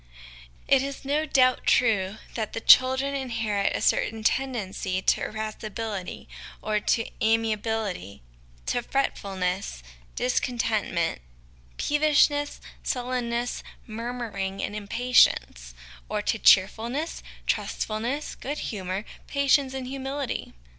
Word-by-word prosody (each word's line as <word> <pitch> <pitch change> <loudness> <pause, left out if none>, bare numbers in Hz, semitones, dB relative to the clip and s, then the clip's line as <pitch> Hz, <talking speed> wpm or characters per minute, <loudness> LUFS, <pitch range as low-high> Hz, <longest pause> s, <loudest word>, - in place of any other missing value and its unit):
It 275 -1 +5
is 275 0 -5
no 300 +3 0
doubt 255 -2 +3
true 210 -4 +3 0.2
that 220 -3 -3
the - - -2
children 260 +4 +6
inherit 230 -7 -1
a - - -2
certain 220 0 +1
tendency 210 -7 -1
to - - +2
irascibility 215 -2 -5 0.3
or 215 0 0
to 225 +2 +1 0.2
amiability, 220 - 0 0.4
to 245 - 0
fretful 235 -6 -2
ness, 180 - -2 0.3
discon 250 0 0
tentment, 200 - 0 0.6
peevishness, 290 -1 +2 0.2
sullenness, 245 -1 -2 0.2
murmuring, 225 -4 -4
and 205 - -3
impatience; 205 - +2 0.3
or 210 -1 -1
to 220 - 0
cheerfulness, 230 - +3 0.2
trustfulness, 235 +7 -2
good 290 +3 -5 0.2
humour, 190 +1 -3 0.2
patience, 280 -1 +2
and 260 -1 -4
humility. 270 - -4
230 Hz, 105 wpm, -26 LUFS, 205-265 Hz, 0.6 s, children